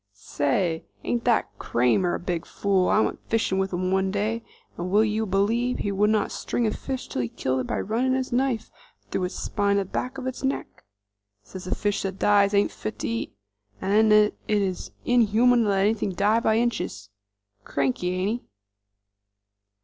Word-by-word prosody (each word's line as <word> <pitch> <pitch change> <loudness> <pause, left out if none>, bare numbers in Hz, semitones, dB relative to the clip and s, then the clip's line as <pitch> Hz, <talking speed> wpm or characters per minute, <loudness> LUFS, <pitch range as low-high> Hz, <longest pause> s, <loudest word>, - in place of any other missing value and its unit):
"Say, 160 - -1 0.2
ain't 235 -1 -1
that 235 -3 +1
Cramer 125 +10 +2
a - - -4
big 175 -2 -3
fool? 195 -2 +1
I 215 - +4
went - - -1
fishin' 220 -4 +1
with 190 0 -1
him 185 +1 -1
one 190 0 +2
day 215 +4 -1 0.3
and 175 +1 -4
will 210 +3 +4
you 220 +1 -1
b'lieve 225 +6 +1
he 205 - -2
would 205 +2 +2
not 215 -1 +1
string 240 - -2
a 215 - +1
fish 265 +2 -5
till - - -2
he'd 115 - -5
killed 130 0 0
it 125 - -3
by - - -1
running 250 +5 0
his 260 0 -2
knife 250 -2 0 0.4
through 185 - 0
its 180 - -5
spine 200 -1 0
at 200 - 0
the - - -18
back 255 +2 -3
of 265 - -6
its 260 -1 -4
neck? 270 - -3 0.6
Says 180 - -9
a - - -1
fish 205 -1 -1
that 195 -1 -4
dies 205 0 +4
ain't 200 - +3
fit 105 +1 -6
to - - -3
eat, 115 -2 -3 0.4
'nd 210 +3 +3
then 210 0 +6 0.2
it 210 -1 +2
is 185 -2 -3 0.2
inhuman 240 0 +4
to - - +1
let 195 -1 +2
anything 205 -1 +1
die 205 +5 +3
by 220 -1 +2
inches. 160 - -2 0.5
Cranky, 140 +8 -1
ain't 205 +6 -1
he?" - - -34
205 Hz, 195 wpm, -25 LUFS, 185-225 Hz, 0.6 s, then